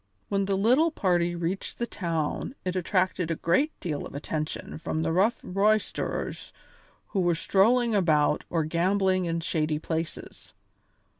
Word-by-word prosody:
When 200 Hz, -1 st, +1 dB
the 195 Hz, 0 st, 0 dB
little 255 Hz, +11 st, +4 dB
party 175 Hz, -, +1 dB
reached 175 Hz, +3 st, -3 dB
the 235 Hz, -, -1 dB
town 170 Hz, -, -3 dB
it 185 Hz, 0 st, -1 dB
attracted 185 Hz, -1 st, 0 dB
a 165 Hz, -, 0 dB
great 260 Hz, -, +2 dB
deal 155 Hz, -5 st, -3 dB
of -, -, -9 dB
attention 155 Hz, +1 st, -4 dB
from 160 Hz, 0 st, -2 dB
the 165 Hz, -, 0 dB
rough 195 Hz, +8 st, +2 dB
roisterers 210 Hz, +3 st, -1 dB, 0.6 s
who 200 Hz, -, -1 dB
were 175 Hz, -2 st, +2 dB
strolling 230 Hz, +7 st, +3 dB
about 155 Hz, -7 st, +3 dB
or 165 Hz, -2 st, +1 dB
gambling 185 Hz, +3 st, +1 dB
in 165 Hz, 0 st, -1 dB
shady 155 Hz, -2 st, 0 dB
places. 160 Hz, +1 st, -5 dB
180 Hz, 145 wpm, -27 LUFS, 165-200 Hz, 0.6 s, little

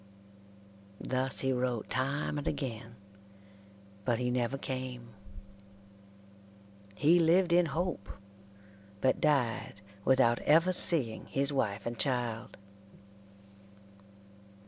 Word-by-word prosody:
Thus 130 Hz, +1 st, +1 dB
he 135 Hz, 0 st, +1 dB
wrote 125 Hz, -3 st, -2 dB
time 140 Hz, +4 st, -2 dB
and 145 Hz, -, -6 dB
again, 115 Hz, -4 st, -5 dB, 1.1 s
but 120 Hz, +2 st, 0 dB
he 125 Hz, +1 st, -1 dB
never 125 Hz, +2 st, -1 dB
came. 130 Hz, -3 st, -6 dB, 1.8 s
He 160 Hz, +8 st, +4 dB
lived 170 Hz, +2 st, +3 dB
in 175 Hz, -1 st, +4 dB
hope, 155 Hz, -, -3 dB, 0.9 s
but 130 Hz, +5 st, +1 dB
died 125 Hz, -9 st, 0 dB, 0.2 s
without 120 Hz, -2 st, +3 dB
ever 165 Hz, +4 st, +3 dB
seeing 135 Hz, -11 st, +3 dB
his 140 Hz, +1 st, -1 dB
wife 105 Hz, -6 st, -2 dB
and 120 Hz, -1 st, -5 dB
child. 120 Hz, -4 st, -2 dB
130 Hz, 95 wpm, -31 LUFS, 120-150 Hz, 1.8 s, He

